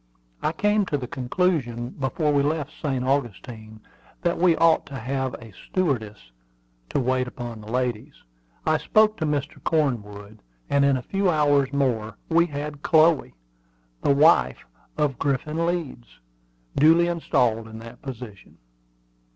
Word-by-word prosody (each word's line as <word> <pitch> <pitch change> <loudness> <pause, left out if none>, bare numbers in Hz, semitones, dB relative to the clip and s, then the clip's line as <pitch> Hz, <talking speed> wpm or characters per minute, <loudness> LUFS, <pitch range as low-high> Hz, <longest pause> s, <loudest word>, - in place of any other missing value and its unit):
I - - +1
came 210 +4 +1
to 145 - 0
the 130 - -5
conclusion, 125 -3 -1
before 145 +3 -1
we 140 - +3
left 150 0 -1
St. 135 -5 -3
Augustine, 115 -4 -3 0.4
that 170 -1 0
we 175 -2 +4
ought 165 -1 +3
to 140 - -8
have 130 +2 -3
a 115 -2 -12
stewardess 110 - -3 0.6
to - - 0
wait 130 0 0
upon 120 -3 -7
the 105 +1 -10
ladies. 125 -3 -2 0.5
I 155 0 +3
spoke 215 0 +3
to 160 - -1
Mr. 145 0 -3
Cornwood, 110 -9 -2 0.3
and 140 0 +4
in 140 -1 +3
a 125 - -6
few 195 +4 0
hours 145 -4 +3
more 115 -7 -1
we 170 +1 +4
had 145 -1 -6
Chloe, 160 0 +3 0.7
the 140 - +3
wife 65 - +4 0.3
of 145 -4 0
Griffin 150 +4 -1
Leeds, 160 -9 -3 0.7
duly 165 +4 +5
installed 125 -10 0
in 110 0 -10
that 115 +2 -11
position. 120 -7 -9
140 Hz, 145 wpm, -24 LUFS, 120-155 Hz, 0.7 s, duly